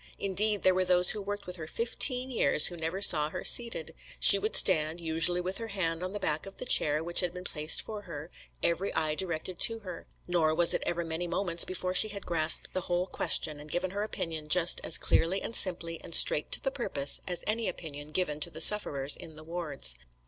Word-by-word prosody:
Indeed, 205 +2 +1
there 185 - +3
were 185 0 -1
those 180 0 +4
who 210 - -6
worked 205 0 -8
with 180 0 -7
her 155 -2 -9
fifteen 250 - 0
years 150 - +3
who 175 - +2
never 165 +4 -2
saw 150 -4 +4
her - - -8
seated; 195 -10 +1 0.3
she 200 - +6
would 210 +2 -4
stand, 160 -2 +3
usually 165 +2 -1
with 185 +3 -5
her 230 - -7
hand 175 -5 -3
on 185 0 -5
the 205 - -7
back 155 -1 -3
of 195 - -14
the - - -5
chair 150 +1 +1
which 170 +1 +5
had 180 -2 +1
been 180 - -9
placed 155 -3 -1
for 215 -2 -9
her, 165 -4 -11 0.3
every 180 +4 -2
eye 155 -1 -2
directed 170 +1 -3
to 225 - +3
her; 180 -4 -11 0.2
nor 165 -3 -1
was 170 0 +3
it - - -3
ever 170 0 -4
many 165 +2 -6
moments 170 -1 -1
before 185 0 -4
she 215 - +4
had 200 -2 -8
grasped 160 -2 -2
the 185 - -4
whole 175 +1 -3
question, 155 -4 0
and 150 +1 -12
given 175 +3 -4
her 200 +1 -6
opinion 165 -7 -6
just 175 +1 +3
as - - +3
clearly 185 +4 0
and 230 - -7
simply 170 -3 +2
and 170 - -2
straight 150 - +5
to - - +2
the 270 - -3
purpose 145 - -1
as 180 -2 -4
any 220 0 -3
opinion 150 -4 -10
given 155 -2 -3
to - - -1
the 160 - -11
sufferers 145 -8 +6
in 160 - -12
the 155 - -14
wards. 155 - -3
175 Hz, 225 wpm, -27 LUFS, 160-195 Hz, 0.3 s, she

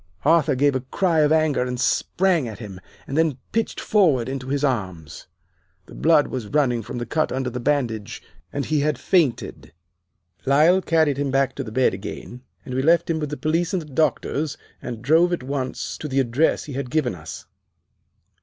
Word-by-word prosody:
"Arthur 155 -2 +4
gave 140 +2 +3
a 130 - 0
cry 165 +6 0
of 150 0 +4
anger 155 -4 +2
and 125 0 -2
sprang 170 +3 +1
at 110 -3 -7
him, 100 -5 -9 0.2
and 135 - -5
then 160 -4 +2
pitched 225 -1 -1
forward 155 - +2
into 130 -1 -5
his 140 +1 -1
arms. 95 - -3 0.6
The - - -14
blood 160 -2 +4
was 125 -5 -4
running 125 -3 +1
from 115 +3 -7
the 120 - -3
cut 155 +3 0
under 130 -1 -2
the 125 - -4
bandage, 120 -6 -1 0.3
and 140 - -3
he 155 -1 +1
had 150 -1 0
fainted. 130 - 0 0.7
Lyle 155 +7 +4
carried 160 -5 +2
him 140 -1 -1
back 135 0 +1
to - - -4
the 110 - -8
bed 130 -1 +2
again, 105 +5 -7 0.2
and 130 - -6
we 130 - 0
left 170 +3 +3
him 160 - -1
with 150 -2 -3
the 150 - -5
police 165 +4 0
and 185 - 0
the 150 -3 -14
doctors, 150 0 0 0.2
and 115 -2 -6
drove 165 +6 +4
at 170 - -3
once 130 -1 -4
to 150 - -5
the 135 -1 0
address 135 +5 +1
he 145 - -8
had 135 -1 -4
given 135 -4 0
us. 80 -3 -9
140 Hz, 195 wpm, -23 LUFS, 125-155 Hz, 0.7 s, Arthur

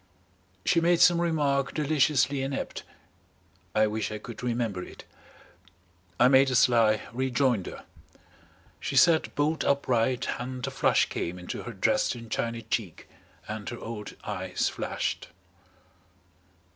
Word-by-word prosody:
She 170 - +3
made 170 0 +3
some 170 -1 +5
remark 145 -5 0
deliciously 145 -2 +2
inept 135 0 -4 0.9
I 110 0 +5
wish 110 0 -2
I 105 - -4
could 115 +2 -9
remember 115 -6 -2
it. - - -11 1.2
I 125 - +7
made 135 +1 +5
a 125 - 0
sly 115 -3 +4
rejoinder. 130 -4 0 1.0
She 140 - -4
sat 160 +4 +4
bolt 150 +2 0
upright 130 -3 +1
and 125 0 -5
a - - -4
flush - - +3
came 85 +2 -4
into 90 0 -6
her - - -7
Dresden 115 -2 0
china 115 0 -2
cheek 105 -5 -4 0.4
and 110 -2 -5
her 120 - -6
old 110 -3 -7
eyes 95 -3 -2
flashed. - - -3
125 Hz, 125 wpm, -27 LUFS, 110-140 Hz, 1.2 s, I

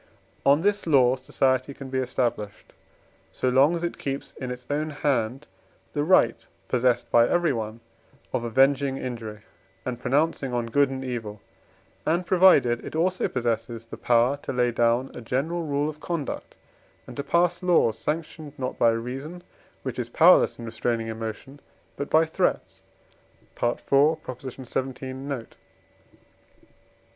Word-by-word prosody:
On 145 +4 +5
this 205 -2 +1
law 130 -5 +5
society 130 +1 0
can 135 -2 -9
be 130 - 0
established, 120 -5 -3 0.6
so 130 - -1
long 135 +6 +4
as 170 - -4
it 175 - -3
keeps 135 0 -4
in 130 - -6
its 125 0 -7
own 150 +2 -1
hand 135 -3 -1 0.5
the 145 - 0
right, 150 -8 +3 0.2
possessed 125 -1 +1
by 120 0 +5
everyone, 115 -10 0 0.5
of - - 0
avenging 135 +3 +2
injury, 115 -5 -6 0.4
and 125 -2 -3
pronouncing 140 -1 0
on 120 -1 0
good 140 -1 +4
and 130 0 -5
evil; 110 -5 -5 0.6
and 170 +3 0
provided 170 -11 +5
it - - -7
also 185 +3 +1
possesses 115 -2 -2
the 115 - -9
power 120 +3 +2
to - - -6
lay 125 -1 +1
down 120 +2 +1
a - - -8
general 155 +8 -2
rule 145 +1 0
of 155 0 -6
conduct, 165 -4 -4 0.5
and - - -10
to 140 - -3
pass 170 +4 +1
laws 175 -11 +3
sanctioned, 150 +4 -5
not 130 -2 -4
by 115 - +5
reason, 135 +10 -4 0.4
which 130 -1 -4
is 120 -1 -3
powerless 170 +8 +5
in 120 - -8
restraining 115 0 -2
emotion, 115 +5 -6 0.4
but 140 - -5
by 160 +1 +5
threats 160 - -1 0.8
(IV. 120 0 +1 0.4
xvii. 130 -1 -5
note). 135 -3 -6
130 Hz, 145 wpm, -25 LUFS, 120-150 Hz, 0.8 s, On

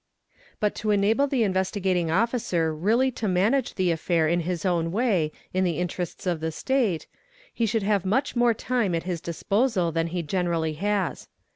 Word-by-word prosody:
But 210 -2 +1
to 215 - -1
enable 210 +7 +3
the 250 -6 +1
tt 190 - -1
vestigating 185 -2 0
Officer 185 -4 +1
really 225 +11 +2
to 225 -3 -3
manage 210 +8 +1
the 185 -2 +1
affair 165 0 +1
in 170 +2 +2
his 175 +1 -3
own 170 -2 +1
way 195 -8 +1 0.2
in 185 +1 +1
the 170 -4 0
nterests 180 0 -4
of 175 -3 0
the 160 +1 -2
State, 220 - 0 0.5
he 230 - 0
should 220 -1 0
have 200 -2 +1
much 225 +10 0
more 240 -1 +3
time 225 -7 0
at 165 - -2
his 175 -2 -3
disposal 195 +2 0
han 165 +1 0
he 170 +1 -3
generally 165 -1 -1
has. 200 +3 -2
185 Hz, 180 wpm, -25 LUFS, 170-220 Hz, 0.5 s, enable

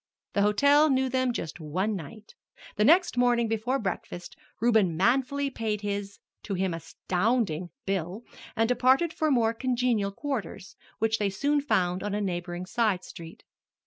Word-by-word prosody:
The 200 - +2
hotel 285 +9 +4
knew 265 -1 +2
them 255 0 +1
just 175 -7 -5
one 185 +7 -1
night. 205 +5 -9 0.4
The 210 - +2
next 335 - +4
morning 240 -1 +3
before 225 +4 0
breakfast 185 -5 -5 0.2
Reuben 215 -7 +3
manfully 270 +7 +1
paid 220 -4 -2
his 200 -1 -4 0.2
to 200 - -4
him 185 -1 -1
astounding 180 +1 -1 0.2
bill 195 +2 -3 0.3
and 225 -1 +2
departed 260 +7 +3
for 315 - 0
more 230 -5 +2
congenial 240 -4 0
quarters, 205 - -5 0.2
which 225 0 +1
they 205 -1 +1
soon 285 +9 +1
found 185 -9 0
on 205 0 -2
a - - -1
neighboring 175 -2 -3
side 210 -3 0
street. 165 -1 -11
215 Hz, 150 wpm, -27 LUFS, 190-250 Hz, 0.4 s, hotel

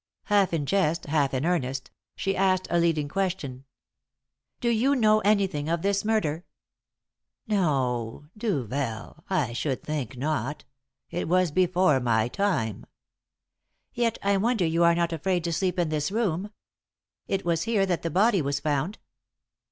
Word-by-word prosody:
Half 205 -2 +2
in 160 -4 -1
jest, 170 -1 +1
half 145 -2 +1
in 130 +2 -1
earnest, 135 -7 -1 0.2
she 195 0 -1
asked 185 -1 +2
a 170 - +3
leading 165 -3 +1
question. 150 -7 -3 0.9
"Do 235 - 0
you 240 +5 +2
know 215 -4 +4
anything 195 -8 +1
of 170 0 -1
this 200 0 +1
murder?" 180 -7 0 1.0
"No. 135 - 0
Duvel! 140 - -3
I 150 -11 0
should 130 +1 -2
think 140 -5 -4
not. 145 0 -2 0.5
It 175 +1 -2
was 180 -1 +2
before 180 -3 +3
my 115 -3 +1
time." 125 - -1 1.1
"Yet 235 -2 0
I 200 0 +3
wonder 220 -2 +1
you 165 +1 +2
are 170 0 +5
not 170 0 0
afraid 175 +2 0
to 170 0 -1
sleep 185 +2 0
in 175 -3 +1
this 155 +2 -1
room. 205 -3 -1 0.8
It 195 -1 -2
was 165 -1 +1
here 205 -4 +3
that 180 -3 -1
the 165 - -2
body 195 +3 +3
was 140 0 -1
found." 150 +7 -1
170 Hz, 150 wpm, -26 LUFS, 145-195 Hz, 1.1 s, are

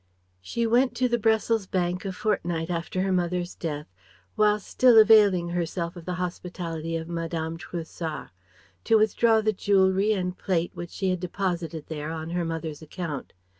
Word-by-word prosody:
She 235 - -2
went 245 +3 +3
to 255 - +2
the 240 -1 0
Brussels 220 -1 +2
bank 180 0 -1
a 195 - -2
fortnight 175 -4 -1
after 175 +2 -2
her 195 - 0
mother's 180 -1 -1
death 150 -4 -4 0.5
whilst 210 -1 +2
still 250 -3 +5
availing 210 -5 +6
herself 170 0 -2
of 170 -2 -10
the 180 - -3
hospitality 175 -2 -4
of 160 0 -6
Madame 165 -1 -3
Trouessart: 165 -2 -6 0.5
to 225 - +5
withdraw 220 +1 +3
the 215 0 +1
jewellery 195 +1 +3
and 180 -2 -2
plate 175 -3 -1
which 175 0 -7
she 190 0 -1
had 185 - -1
deposited 175 -3 -3
there 150 -1 -5
on 160 0 -5
her 175 0 -1
mother's 165 -2 -4
account. 155 -3 -6
180 Hz, 165 wpm, -26 LUFS, 165-205 Hz, 0.5 s, availing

